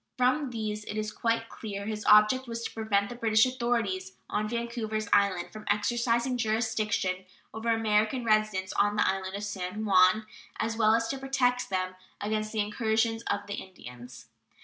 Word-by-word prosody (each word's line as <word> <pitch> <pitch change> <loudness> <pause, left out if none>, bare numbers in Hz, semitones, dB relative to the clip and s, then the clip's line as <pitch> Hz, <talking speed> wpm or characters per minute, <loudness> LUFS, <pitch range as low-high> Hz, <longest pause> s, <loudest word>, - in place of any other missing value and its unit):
From 260 +3 +2
these 215 -3 -4
it 210 - -5
is 215 0 -2
quite 230 0 -1
clear 200 -3 -6
his 215 0 -4
object 210 +5 +5
was 230 0 -5
to - - -4
prevent 205 -3 +1
the 245 - -7
British 220 -1 +4
authorities 230 -7 -1 0.2
on 215 0 -1
Vancouvers 235 -2 -3
Island 195 -3 +2
from 215 0 -9
exercising 235 +4 +1
jurisdiction 215 -4 0 0.3
over 220 +1 -3
American 225 +2 +1
residents 215 -4 +1
on 205 0 +2
the 210 - +2
island 190 0 -2
of 200 - -5
San 205 +1 -4
Juan, 190 +2 +5 0.3
as 225 +1 -1
well 220 -1 +4
as 230 0 0
to 275 - -3
protect 255 -2 0
them 185 -1 -1 0.3
against 215 +1 -2
the 220 - 0
incursions 220 +1 0
of 200 0 0
the 205 - -5
Indians. 125 -9 -12
215 Hz, 170 wpm, -29 LUFS, 205-230 Hz, 0.3 s, object